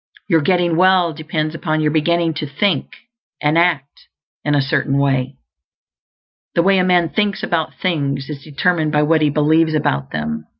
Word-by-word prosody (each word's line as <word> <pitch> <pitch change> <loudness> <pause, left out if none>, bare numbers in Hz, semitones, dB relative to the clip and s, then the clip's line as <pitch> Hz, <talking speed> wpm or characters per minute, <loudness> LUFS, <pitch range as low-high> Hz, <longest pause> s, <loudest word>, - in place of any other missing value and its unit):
Your 165 -4 +3
getting 175 +1 +1
well 185 -2 +3
depends 155 0 -3
upon 155 -1 -2
your 150 -1 +1
beginning 165 +2 +1
to 150 -1 -4
think 145 +2 -1 0.5
and 150 +1 +1
act 165 -5 0 0.4
in 150 0 +1
a - - +3
Certain 140 0 0
Way. 135 -1 0 1.2
The 170 - +3
way 195 0 +3
a - - +2
man 175 -2 +2
thinks 205 +2 -1
about 160 -2 -1
things 140 -6 -1
is 140 -3 -7
determined 155 +1 0
by 150 0 +3
what 160 +1 +2
he 150 - +3
believes 155 +2 +2
about 70 - -1
them. 75 0 -4
155 Hz, 170 wpm, -18 LUFS, 145-170 Hz, 1.2 s, Your